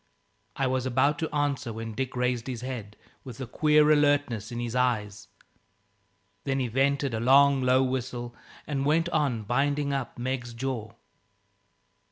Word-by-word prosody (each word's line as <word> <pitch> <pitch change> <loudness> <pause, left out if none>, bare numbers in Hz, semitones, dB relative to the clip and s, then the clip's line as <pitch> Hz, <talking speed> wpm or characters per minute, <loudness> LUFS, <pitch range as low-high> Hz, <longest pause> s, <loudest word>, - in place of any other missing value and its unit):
I 135 - 0
was 130 0 0
about 130 +4 +2
to 160 - -2
answer 145 -5 -1
when 115 0 -6
Dick 130 +3 -3
raised 125 -1 -1
his 125 -3 -4
head, 120 -5 -6 0.3
with 125 -2 -10
a 130 - -4
queer 150 +4 +3
alertness 145 -8 +2
in 120 - -4
his 120 0 -4
eyes. 110 -5 -1 1.2
Then 135 -1 -1
he 125 -2 -1
vented 135 +2 +1
a 110 - -1
long, 135 +3 +5
low 130 +1 +3
whistle, 125 -2 -3 0.3
and 140 -2 -2
went 165 +4 +2
on 145 -9 0
binding 140 +5 0
up 135 -2 -4
Meg's 120 -1 -4
jaw. 115 -4 -4
130 Hz, 155 wpm, -27 LUFS, 120-140 Hz, 1.2 s, long